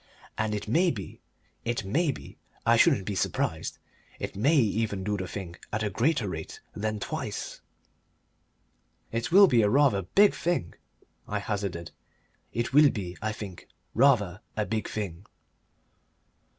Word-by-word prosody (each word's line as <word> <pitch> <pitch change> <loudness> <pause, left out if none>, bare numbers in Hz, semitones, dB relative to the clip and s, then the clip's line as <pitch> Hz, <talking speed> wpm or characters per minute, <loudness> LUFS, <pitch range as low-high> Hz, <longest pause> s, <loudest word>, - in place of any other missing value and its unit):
"And 110 -1 -1
it 105 - -5
may 170 - +3
be, 100 - -6 0.4
it 120 -3 -2
may 150 - +1
be - - -11 0.3
I - - +5
shouldn't 95 - +4
be 105 - -2
surprised 95 - -1 0.4
it - - -5
may 135 +11 +3
even 110 -6 +1
do 105 +1 -1
the 95 -2 -4
thing 90 -3 -7
at 105 +1 -1
a 105 - -1
greater 125 - +1
rate 80 -4 -6 0.2
than 110 +1 -2
twice." - - -5 1.5
"It 115 +8 -2
will 200 +3 +9
be 120 - +4
rather 125 0 +4
a 95 - -9
big 205 0 +7
thing," 170 - -1 0.5
I 105 - -2
hazarded. 100 -5 -3 0.6
"It 120 +1 -2
will 150 +1 +8
be, 95 -7 -5
I 110 +1 -1
think, 100 -5 -8 0.3
rather 105 -8 +3 0.2
a 105 - +1
big 110 -1 -2
thing." 100 -3 -5
105 Hz, 150 wpm, -28 LUFS, 100-125 Hz, 1.5 s, will